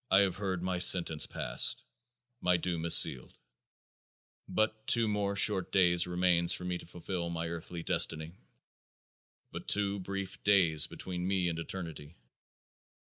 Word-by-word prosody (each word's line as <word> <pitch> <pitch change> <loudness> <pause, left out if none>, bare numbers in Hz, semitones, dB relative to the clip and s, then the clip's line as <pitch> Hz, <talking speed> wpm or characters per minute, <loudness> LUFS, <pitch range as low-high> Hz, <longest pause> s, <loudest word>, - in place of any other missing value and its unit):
I 95 - +5
have 95 -3 -1
heard 95 -3 -4
my 90 -1 -2
sentence 85 -4 +3
passed; - - +1 0.6
my 90 0 +2
doom 85 -1 -4
is 85 - +7
sealed. 65 - +3 1.1
But 110 0 -2
two 115 -2 +3
more 100 -1 -2
short 95 -2 +2
days 90 -2 +3
remains 90 -1 +1
for - - -9
me 90 -1 -3
to - - -12
fulfill 90 0 -6
my 85 -1 -4
earthly 85 0 -7
destiny. 80 0 +1 1.2
But - - -9
two 100 -1 0
brief 95 0 -7
days 90 -6 +3
between 90 -1 -6
me 95 -2 0
and 85 -1 -5
eternity. 85 -3 -8
90 Hz, 140 wpm, -30 LUFS, 85-95 Hz, 1.2 s, is